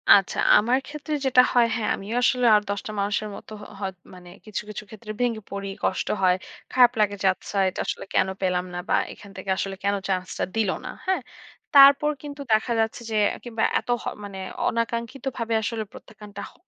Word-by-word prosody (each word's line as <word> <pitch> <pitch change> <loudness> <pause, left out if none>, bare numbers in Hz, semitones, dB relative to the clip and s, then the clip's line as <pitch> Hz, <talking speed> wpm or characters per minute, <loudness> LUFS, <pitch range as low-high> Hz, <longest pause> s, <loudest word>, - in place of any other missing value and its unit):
আচ্ছা, 195 -2 +1 0.2
আমার 240 +4 +3
ক্ষেত্রে 300 +1 -5
যেটা 255 -1 +6
হয় 240 -1 +5
হ্যাঁ, 225 -3 -1
আমিও 205 +4 -6
আসলে 250 -1 +3
আর 210 - +4
১০ 200 0 -1
টা - - -4
মানুষের 205 +1 -1
মতো 215 - -11 0.3
হয় 195 -2 -2 0.2
মানে 180 -1 -13 0.2
কিছু, 215 -2 -4
কিছু 210 - -6
ক্ষেত্রে 215 0 -8
ভেঙে 230 -3 0
পড়ি, 200 0 -4
কষ্ট - - 0
হয়। 180 -1 +5 0.4
খারাপ 245 -2 +7
লাগে 205 -1 +2
যে, 195 - +3
আচ্ছা 200 - -7
এটা 185 - -8
আসলে - - -3
কেনো 190 - +2
পেলাম 180 -1 0
না, 175 - -3
বা - - +4 0.2
এখান 200 -2 -14
থেকে 190 +1 -7
আসলে 195 0 -2
কেনো 200 0 +1
চান্স 185 -1 0
টা - - +1
দিল 220 -3 +2 0.2
না। - - -5 0.2
হ্যাঁ? 380 0 +1 0.5
তারপর 280 +2 +8
কিন্তু 290 -1 -7
দেখা 220 +3 +2
যাচ্ছে 225 +2 0
যে, - - -1 0.3
কিংবা 230 -2 -3 0.2
এত - - -15
হ - - -12 0.2
মানে 200 -1 -7 0.3
অনাকাঙ্ক্ষিতভাবে 235 +1 -2
আসলে 220 0 -2
প্রত্যাখ্যানটা 210 -2 -11
হ - - -25
215 Hz, 195 wpm, -25 LUFS, 200-245 Hz, 0.5 s, তারপর